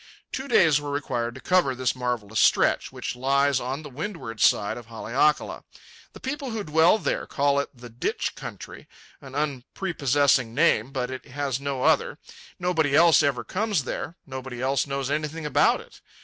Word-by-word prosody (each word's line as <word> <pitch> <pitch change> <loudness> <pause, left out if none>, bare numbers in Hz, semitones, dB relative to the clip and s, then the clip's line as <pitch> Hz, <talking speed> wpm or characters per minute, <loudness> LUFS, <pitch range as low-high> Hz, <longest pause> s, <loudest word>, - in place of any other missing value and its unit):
Two 265 +1 -4
days 160 - +4
were 145 - -5
required 120 -4 -2
to 130 - -10
cover 180 -8 +2
this 130 0 0
marvellous 120 -4 -2
stretch, - - +3
which - - -5
lies 140 +1 +2
on 135 +5 -4
the - - -7
windward 145 - -6
side 100 - +3
of 120 -2 -10
Haleakala. 120 +6 0 0.5
The - - -11
people 275 0 -4
who 220 -3 -3
dwell 160 +5 +4
there - - -2
call 140 0 +1
it 140 - -2
the 120 -1 -12
"ditch 115 +1 -3
country," - - -9 0.3
an 135 -1 -11
unprepossessing 140 -3 0
name, 135 -5 +3
but 130 -2 -3
it 130 - -7
has 140 -1 -2
no 140 -2 -3
other. - - +2 0.4
Nobody 165 -5 +1
else 165 +1 +6
ever 135 -4 0
comes 200 - -1
there. 160 +5 -5
Nobody 130 -2 -7
else 135 +2 0
knows 135 -1 -2
anything 155 +1 -2
about 150 - +3
it. - - -17
140 Hz, 170 wpm, -25 LUFS, 125-155 Hz, 0.5 s, else